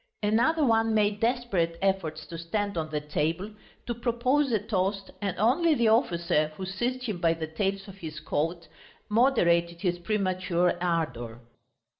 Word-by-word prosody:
Another 245 +10 +3
one 225 -2 +3
made 210 -1 +2
desperate 225 -9 0
efforts 175 -6 -1
to 165 - -8
stand 200 +4 -2
on 160 -2 -2
the 150 -1 -1
table, 160 +6 -2 0.3
to 240 - -2
propose 245 +4 +1
a 220 - +3
toast, 195 -2 -2
and 195 -3 -2
only 295 - +3
the 235 -4 +3
officer, 170 - +2
who 190 - -4
seized 240 +7 -2
him 215 -8 -3
by 165 -1 +3
the 160 -1 -4
tails 195 +5 -2
of 195 -1 -11
his 155 -3 -6
coat, 165 +3 -2 0.4
moderated 170 -8 +3
his 175 -2 0
premature 185 -3 0
ardour. 130 -10 -2
195 Hz, 155 wpm, -27 LUFS, 170-225 Hz, 0.4 s, Another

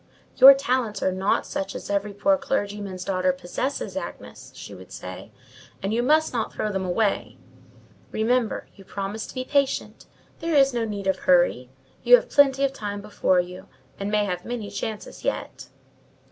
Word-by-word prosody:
"Your 270 +1 +11
talents 250 -6 -1
are 190 - +2
not 190 +2 0
such 195 0 -4
as - - -6
every 200 +1 -1
poor 280 +9 +2
clergyman's 205 -9 -3
daughter 185 -1 +1
possesses, 180 +10 -4
Agnes," - - -8
she - - -9
would - - -13
say, - - -8 0.5
"and 195 +2 -1
you 235 - +1
must 310 +4 +3
not 230 -3 -2
throw 215 - -2
them 190 -1 -2
away. 195 +3 -1 0.7
Remember, 230 +1 0
you 195 - -15
promised 200 +3 -5
to - - -11
be 255 0 -3
patient: 280 -1 -1 0.3
there 330 -1 -1
is 275 -2 +5
no 235 -1 0
need 205 -2 -5
of 190 - +1
hurry: 175 -8 +3 0.3
you - - +8
have - - -2
plenty 275 -1 +4
of 275 -1 +1
time 205 -5 -5
before 200 -3 +1
you, 180 +1 -10 0.3
and 200 +1 -3
may 210 0 +2
have 180 -2 -3
many 235 -4 -5
chances 210 +1 -6
yet." - - -4
210 Hz, 175 wpm, -24 LUFS, 195-260 Hz, 0.7 s, Your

